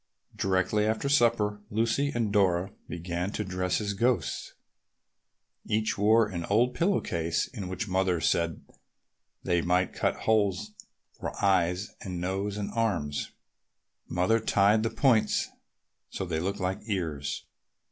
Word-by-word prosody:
Directly 95 +3 +1
after 110 +5 0
supper 115 -6 +2
Lucy 115 +6 +1
and 110 -4 0
Dora 95 -2 +2 0.2
began 85 +2 -3
to 105 - -2
dress 95 -2 -1
as 100 -2 -2
ghosts. 100 -7 0 1.1
Each 110 0 0
wore 110 +3 +4
an 90 -4 -4
old 120 +5 +2
pillow 185 +7 +2
case 80 -1 -1
in 100 -7 -7
which 95 +4 -4
Mother 95 -2 +1
said 85 +1 0 0.8
they 85 -1 +2
might 90 +1 +1
cut - - 0
holes 105 -2 +1 0.5
for - - -5
eyes 90 0 +2
and 90 -3 -5
noses 95 +3 -2
and 105 -1 -3
arms. 90 -11 -1 0.8
Mother 90 +6 +2
tied 105 0 +3
the 115 - 0
points 115 -1 +2 0.6
so 95 - -4
they 80 -3 -2
looked 100 +4 -2
like 95 0 -1
ears. 75 -9 -3
100 Hz, 135 wpm, -28 LUFS, 90-110 Hz, 1.1 s, wore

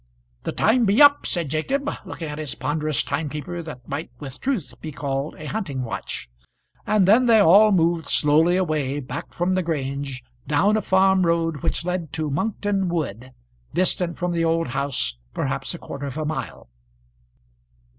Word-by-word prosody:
"The - - -1
time 235 +2 +3
be 205 +3 +3
up," 285 -1 +7
said 170 -5 -1
Jacob, 270 - -1 0.2
looking 175 -3 -6
at 150 0 -6
a 150 -4 -4
ponderous 150 0 -1
timekeeper 155 +3 -4
that 140 -7 -10
might 145 +4 -4
with 135 -1 -9
truth 195 - -2
be 155 - -6
called 140 0 -3
a 155 - -9
hunting 150 -9 -3
watch; 115 - -5 0.6
and 210 -4 +3
then 240 +5 +5
they 230 -1 +6
all 205 +3 +7
moved 170 -4 +2
slowly 160 +4 +4
away 150 -6 0
back 135 - -6
from 175 +2 0
the 185 - +2
Grange, 140 -5 -3 0.2
down 175 +9 +3
a 215 - +1
farm 190 0 +3
road 165 -2 +1
which 170 0 -1
led 180 -4 -2
to 155 -2 -2
Monkton 200 +3 -1
Wood, 130 - -3 0.4
distant 180 -1 +1
from 180 0 -1
the 170 -1 0
old 165 -2 +1
house 130 - -2 0.2
perhaps - - -2
a - - -6
quarter 140 0 -6
of 135 - -6
a 155 - -2
mile. 155 - -5
165 Hz, 170 wpm, -23 LUFS, 145-185 Hz, 0.6 s, up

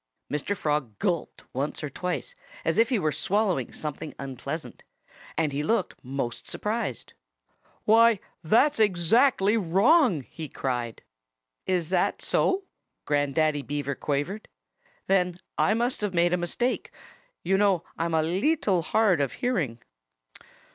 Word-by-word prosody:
Mr. 150 +7 -1
Frog 145 - -1
gulped 170 - -2
once 140 +4 -3
or 150 - -2
twice, 180 +4 -3 0.3
as 165 +6 +1
if 230 +1 +4
he 250 - +2
were 155 -6 +1
swallowing 200 +3 0
something 150 0 -6
unpleasant. 135 -2 -6 0.6
And 155 -3 +1
he 140 +1 -2
looked 195 +5 0
most 125 -3 -4
surprised. 210 - -3 0.7
"Why, 225 -1 +6 0.2
that's 235 - +3
exactly 210 - +4
wrong!" 205 - +4
he 155 +3 -8
cried. 120 -3 -3 0.6
"Is 180 -3 0
that 180 -2 +1
so?" 385 +1 +1 0.4
Grandaddy 145 +1 +1
Beaver 145 0 -3
quavered. 145 +10 -3 0.6
"Then 180 -2 +1 0.2
I 215 - +3
must 240 +2 0
have 205 -3 -2
made 170 +1 +3
a - - +5
mistake. 210 +8 -1 0.5
You 195 - +2
know 195 -5 +3
I'm 165 0 -1
a 160 - +3
leetle 190 - +1
hard 195 -2 +2
of 135 -4 -1
hearing." 145 - -2
175 Hz, 130 wpm, -27 LUFS, 145-210 Hz, 0.7 s, Why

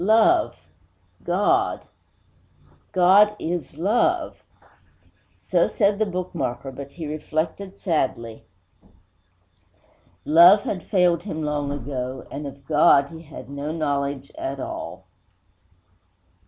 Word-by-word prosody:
_ - - -2
Love! 215 - +4 0.7
God! 285 - +1 1.1
God 200 +3 +5
is 170 -5 -4
Love! 245 - 0 1.0
So - - +1
said 200 -2 +1
the 215 - +1
bookmarker; 145 -9 -4
but, 140 +1 -8
he 165 - -7
reflected 155 +5 -4
sadly, 120 - -2 1.8
love 175 +6 +7
had 185 - -3
failed 180 -3 +2
him 160 -5 -5
long 145 -1 -2
ago, 130 -2 -5
and 145 0 -5
of 140 0 -12
God 145 -1 +4
he 160 -1 -10
had 155 -2 -11
no 140 +2 -5
knowledge 140 -3 -2
at 135 0 -4
all. - - -7
160 Hz, 105 wpm, -23 LUFS, 140-190 Hz, 1.8 s, love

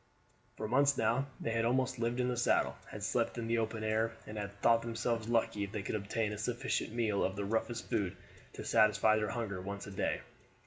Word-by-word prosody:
For 110 - -3
months 140 +3 +4
now 120 +5 +2
they 115 - -2
had 115 0 +1
almost 130 +1 +1
lived 120 +1 0
in 125 - +2
the 125 - 0
saddle, 120 - +2
had - - -7
slept - - 0
in 115 - -2
the 115 0 +1
open 110 -1 -2
air, 110 +1 +1
and 105 - -8
had 100 -2 -3
thought 115 0 +5
themselves 115 -1 -2
lucky 115 -3 +1
if 100 - -10
they 105 -2 -3
could - - -3
obtain 105 +1 -1
a 105 - -6
sufficient 120 +1 -1
meal 110 -3 +1
of 95 - 0
the 100 0 -2
roughest 115 +3 -1
food 105 -7 -1 0.4
to - - -7
satisfy 110 0 +4
their 105 -1 0
hunger 105 -6 -3
once 100 +1 -5
a 100 - -8
day. 95 - -1
115 Hz, 220 wpm, -34 LUFS, 105-120 Hz, 0.4 s, thought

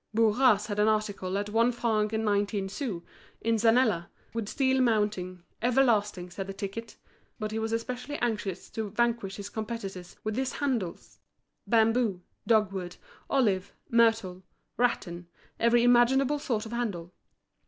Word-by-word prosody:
Bourras 220 -1 +4
had 205 -1 -3
an 210 - +4
article 205 -3 0
at 205 +1 -3
one 230 +3 +3
franc 220 -3 0
and 220 0 -1
nineteen 205 -1 0
sous, 200 - -4 0.4
in 230 0 +1
zanella, 225 -6 +3 0.3
with 225 -3 -3
steel 265 -1 +2
mounting, 210 -6 0 0.2
everlasting, 215 -7 +2
said 195 +2 -5
the 195 - -6
ticket, 215 +3 -6 0.4
But 215 -2 -4
he 220 - -2
was 225 0 -2
especially 250 +5 -3
anxious 210 -6 -3
to 220 -2 -3
vanquish 230 -2 0
his 200 0 -7
competitors 205 -5 -5
with 215 0 -2
his 265 0 -1
handles—bamboo, 225 -2 -1 0.2
dogwood, 195 -5 +1 0.3
olive, 205 -9 +1 0.2
myrtle, 225 -6 +3 0.3
rattan, 175 -8 -1 0.3
every 235 +1 +4
imaginable 255 +4 +4
sort 230 -6 -2
of 220 - -8
handle. 195 -8 -3
220 Hz, 135 wpm, -28 LUFS, 195-235 Hz, 0.4 s, Bourras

